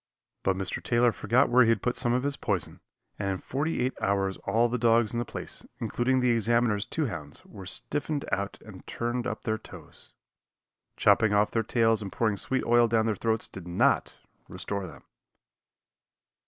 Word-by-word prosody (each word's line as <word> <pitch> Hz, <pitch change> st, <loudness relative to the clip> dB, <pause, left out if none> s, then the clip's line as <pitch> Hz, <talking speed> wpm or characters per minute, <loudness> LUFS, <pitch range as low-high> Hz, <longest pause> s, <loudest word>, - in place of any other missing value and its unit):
But 95 Hz, -, +1 dB
Mr. 95 Hz, -1 st, -3 dB
Taylor 120 Hz, 0 st, +3 dB
forgot 120 Hz, +6 st, +2 dB
where 125 Hz, +1 st, +5 dB
he 115 Hz, -, +5 dB
had 115 Hz, -, +1 dB
put 125 Hz, -, 0 dB
some 120 Hz, -, 0 dB
of 125 Hz, +1 st, +1 dB
his 140 Hz, 0 st, -1 dB
poison, 100 Hz, -, -3 dB, 0.4 s
and 100 Hz, -2 st, -1 dB
in 95 Hz, -, -1 dB
forty 145 Hz, -, -2 dB
eight 130 Hz, +1 st, 0 dB
hours 95 Hz, -1 st, 0 dB
all 115 Hz, +4 st, +3 dB
the 120 Hz, +1 st, -2 dB
dogs 115 Hz, -1 st, +3 dB
in 120 Hz, -, -1 dB
the 120 Hz, -, -2 dB
place, 110 Hz, -, -6 dB, 0.2 s
including 130 Hz, +1 st, 0 dB
the 125 Hz, -1 st, +3 dB
Examiner's 115 Hz, -2 st, +2 dB
two 160 Hz, -, -1 dB
hounds, 75 Hz, -, -7 dB
were 95 Hz, -2 st, -11 dB
stiffened 145 Hz, +7 st, -1 dB
out 100 Hz, 0 st, -2 dB
and 100 Hz, -4 st, -12 dB
turned 120 Hz, +1 st, -2 dB
up -, -, -5 dB
their 110 Hz, -1 st, -1 dB
toes. -, -, -13 dB, 0.8 s
Chopping 110 Hz, -2 st, +4 dB
off 105 Hz, +1 st, +3 dB
their 115 Hz, -, +1 dB
tails 115 Hz, 0 st, +2 dB
and 100 Hz, -2 st, -6 dB
pouring 110 Hz, -3 st, 0 dB
sweet 130 Hz, +6 st, 0 dB
oil 120 Hz, 0 st, +5 dB
down 110 Hz, -1 st, +2 dB
their 110 Hz, -2 st, 0 dB
throats 110 Hz, +1 st, 0 dB
did 90 Hz, -2 st, -10 dB
not 85 Hz, -, +1 dB, 0.3 s
restore 100 Hz, -2 st, -5 dB
them. 70 Hz, -6 st, -13 dB
115 Hz, 185 wpm, -28 LUFS, 100-120 Hz, 0.8 s, where